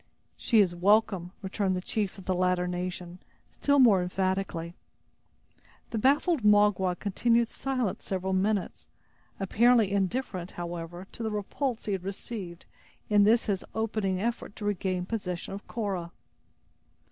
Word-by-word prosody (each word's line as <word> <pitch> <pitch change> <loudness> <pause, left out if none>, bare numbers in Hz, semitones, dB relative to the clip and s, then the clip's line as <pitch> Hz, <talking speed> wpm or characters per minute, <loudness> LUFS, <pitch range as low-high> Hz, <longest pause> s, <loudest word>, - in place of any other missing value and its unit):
"She 230 - +2
is 180 -3 +2
welcome," 190 -1 +2
returned 190 0 0
the - - -1
chief 200 +1 -2
of 190 - -11
the 185 - +1
latter 180 0 +1
nation, 180 0 -4 0.3
still 285 0 +1
more 225 -8 +6
emphatically. 185 -2 -2 1.2
The 225 - -1
baffled 290 - +3
Magua 205 -3 +4
continued 230 +3 +1
silent 255 -7 -2
several 190 0 -2
minutes, 195 +1 -1 0.5
apparently 225 +2 +4
indifferent, 195 -2 -1
however, 175 +1 -6
to - - -9
the 220 - -1
repulse 220 +4 -3
he 210 - -2
had 190 -2 -2
received 190 -2 -6 0.5
in 205 -1 +6
this 225 +3 +4
his 195 -3 -1
opening 215 -4 -1
effort 230 -1 -3
to 210 - -6
regain 185 -3 -1
possession 180 -4 -4
of 200 - -8
Cora. 190 -7 -3
195 Hz, 135 wpm, -28 LUFS, 180-220 Hz, 1.2 s, more